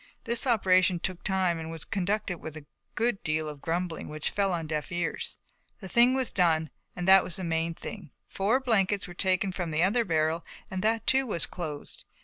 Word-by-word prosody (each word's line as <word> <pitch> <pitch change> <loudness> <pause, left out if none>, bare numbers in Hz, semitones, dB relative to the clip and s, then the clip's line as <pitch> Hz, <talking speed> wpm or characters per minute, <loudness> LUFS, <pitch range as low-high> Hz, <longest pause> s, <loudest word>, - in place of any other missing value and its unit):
This 235 +2 0
operation 185 -6 +4
took 185 0 -4
time 185 -4 +1
and 160 0 -6
was 165 -2 -6
conducted 195 -2 -1
with 160 0 -7
a 150 - -11 0.3
good 230 -2 0
deal 155 0 -1
of 150 -2 -8
grumbling 170 0 -2
which 155 0 -2
fell 200 -1 +1
on 170 -2 -2
deaf 155 +1 -3
ears. 175 -1 -3 0.4
The 190 - -9
thing 240 +6 +5
was 260 -2 -1
done 160 -4 +2 0.2
and 180 0 -4
that 190 0 +8
was 175 - -2
the 190 - -3
main 165 0 -1
thing. 195 -4 -8 0.2
Four 210 +7 +1
blankets 205 -6 +1
were 175 - -9
taken 185 +1 +1
from 180 -2 -3
the 155 +2 +1
other 225 +6 +3
barrel 160 -3 +1 0.3
and 185 0 -2
that 225 +2 +1
too 265 0 +3
was 170 -7 +2
closed. 155 -5 -5
180 Hz, 200 wpm, -28 LUFS, 165-200 Hz, 0.4 s, that